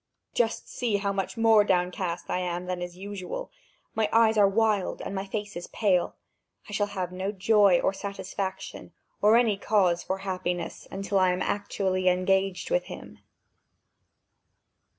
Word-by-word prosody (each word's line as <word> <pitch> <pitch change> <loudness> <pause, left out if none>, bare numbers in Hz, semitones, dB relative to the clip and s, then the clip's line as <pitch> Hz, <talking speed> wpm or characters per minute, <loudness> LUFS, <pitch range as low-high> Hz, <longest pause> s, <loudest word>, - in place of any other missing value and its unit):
Just 230 -2 0
see 230 -5 -1
how 200 0 -1
much 195 +3 -3
more 225 -2 +6
downcast 180 -2 -1
I 180 - -1
am 180 0 -3
than 180 -1 -3
is 175 0 -6
usual! 200 - -6 0.4
My 220 -2 +1
eyes 225 -1 +5
are 205 -2 +6
wild, 210 -1 +1
and - - -5
my 195 0 -3
face 205 +1 -4
is 175 - -6
pale! 190 -5 +1 0.5
I - - -10
shall 205 0 +1
have 185 -3 -4
no 190 +2 -3
joy 200 -2 +4
or - - +1
satisfaction 195 -1 -5 0.3
or 210 +2 +6
any 225 -4 +3
cause 185 -5 +2
for 190 - -3
happiness 180 -2 -3
until 195 0 -1
I 185 -1 +4
am 180 +1 -1
actually 190 -2 0
engaged 190 - +1
with - - +2
him." - - -10
195 Hz, 155 wpm, -27 LUFS, 185-210 Hz, 0.5 s, more